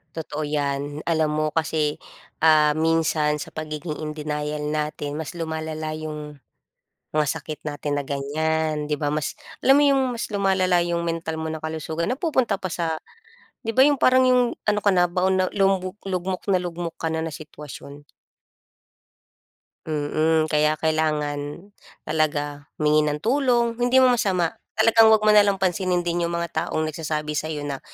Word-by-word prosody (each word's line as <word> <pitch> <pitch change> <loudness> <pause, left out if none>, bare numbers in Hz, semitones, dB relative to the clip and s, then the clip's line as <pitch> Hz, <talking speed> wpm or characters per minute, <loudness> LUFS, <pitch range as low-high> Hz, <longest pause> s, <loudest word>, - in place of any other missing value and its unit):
Totoo 155 -1 -4
yan, 145 0 -2
alam 160 -2 +1
mo 155 0 0
kasi, 155 -2 0 0.4
ah, 155 -1 +5
minsan 155 -1 +1
sa 150 - -7
pagiging 155 0 -5
in 150 0 -5
denial 150 0 -3
natin 150 -1 -3
mas 160 +2 -6
lumalala 160 -1 -4
yung 150 -2 -6 0.7
mga 155 -1 +2
sakit 150 +2 -7
natin 145 -1 -3
na 140 - -2
ganiyan, 155 +2 -1
di 150 0 -1
ba, 145 - 0
mas 150 -1 -1 0.3
alam 270 +2 +6
mo - - +5
yung 275 -1 +4
mas 235 - -4
lumalala 190 -3 +2
yung 170 0 -1
mental 160 -1 -3
mo 160 - -3
na 160 - -3
kalusugan, 160 +2 -3
napupunta 260 - 0
pa 185 - -3
sa 165 -2 -2 0.6
di 225 0 -4
ba, 260 - +7
yung 285 -1 +3
parang 255 0 +5
yung 255 -1 +5 0.2
ano 210 -1 +1
ka 205 - +3
na, 180 - +5
baon 185 +1 +2
na 185 0 +2
lumubu 195 0 0
lugmok 185 0 -3
na 190 -2 +3
lugmok 170 -1 -5
ka 160 - -3
na 160 - -1
na - - -6
sitwasyon. 145 -1 -10 1.8
Mm, 155 +1 +1
kaya 150 +1 +3
kailangan 155 +2 -2 0.3
talaga 145 -2 -1
humingi 150 0 +3
ng 150 - -1
tulong 240 -2 +2
hindi 245 +1 +3
mo 255 -1 +6
masama, 185 -8 +1 0.2
talagang 225 0 +6
'wag 220 -1 +5
mo 215 - +6
nalang 205 -1 +5
pansinin 180 -1 0
din 175 0 -1
yung 170 - -2
mga 170 -1 -2
taong 155 - -1
nagsasabi 155 -1 -3
sa'yo 150 -1 -3
na, 140 -2 -4
160 Hz, 165 wpm, -23 LUFS, 150-185 Hz, 1.8 s, ba